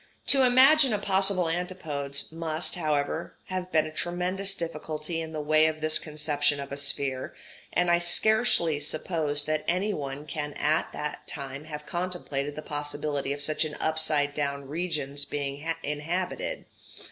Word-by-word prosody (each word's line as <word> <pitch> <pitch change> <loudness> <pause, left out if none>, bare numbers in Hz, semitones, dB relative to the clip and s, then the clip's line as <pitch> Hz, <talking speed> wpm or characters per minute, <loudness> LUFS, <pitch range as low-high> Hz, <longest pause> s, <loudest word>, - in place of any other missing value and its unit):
To 275 - +6
imagine 265 +2 +6
a - - +2
possible 195 -2 +4
antipodes 160 -6 -3
must, 160 -1 +1
however, 155 -1 -1
have 185 -1 -3
been 155 -1 +4
a 155 - -6
tremendous 180 +4 -1
difficulty 160 -1 -3
in 160 0 -6
the 155 - -4
way 155 +1 +4
of 155 0 -2
this 155 0 +4
conception 150 -2 +1
of 140 0 -6
a - - -2
sphere, 135 -2 0 0.4
and 180 +1 +2
I 175 - +4
scarcely 175 -3 +2
suppose 150 -1 -1
that 155 +1 -1
any 190 +5 +1
one 140 -2 -5
can 150 -1 -4
at 155 +2 +1
that 150 0 -5
time 140 +1 -6
have 150 -1 -7
contemplated 170 -6 -3
the 155 - -6
possibility 145 -1 -2
of 145 0 -2
such 155 +2 +1 0.2
upside 155 -2 +1
down 140 -1 -2
regions 145 -3 -2
being 145 +2 -3
inhabited. 180 - -2
155 Hz, 150 wpm, -27 LUFS, 145-175 Hz, 0.4 s, To